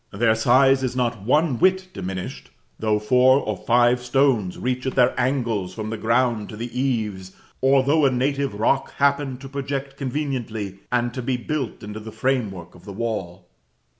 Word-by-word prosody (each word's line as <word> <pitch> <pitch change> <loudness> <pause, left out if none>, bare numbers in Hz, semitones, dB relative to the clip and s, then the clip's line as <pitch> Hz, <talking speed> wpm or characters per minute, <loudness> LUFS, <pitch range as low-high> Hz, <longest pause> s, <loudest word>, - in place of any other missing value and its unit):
Their 110 +2 +2
size 130 +4 +4
is 130 -1 -2
not 120 -4 -1
one 130 +3 +2
whit 185 0 +2
diminished, 95 0 -6 0.3
though 110 -1 +1
four 125 +5 +4
or 105 -6 -2
five 120 +4 +3
stones 125 -7 +1
reach 130 +1 -2
at 130 - -2
their 125 -1 +4
angles 120 -8 -1
from 110 -1 -5
the 115 - -3
ground 115 -1 +1
to 105 - -8
the 120 +1 -6
eaves, 110 -8 -2 0.3
or 135 0 +4
though 145 +1 +3
a - - +3
native 135 -1 -1
rock 135 +5 +1
happen 140 -2 +1
to 135 +1 -10
project 135 0 -4
conveniently, 125 -8 -3
and 120 -1 0
to 130 - -4
be 125 +1 -1
built 130 -2 -4
into 105 +1 -6
the 110 +1 -9
framework 110 -8 -2
of 90 - -17
the 100 0 -8
wall. 95 -5 -4
125 Hz, 175 wpm, -23 LUFS, 110-135 Hz, 0.3 s, size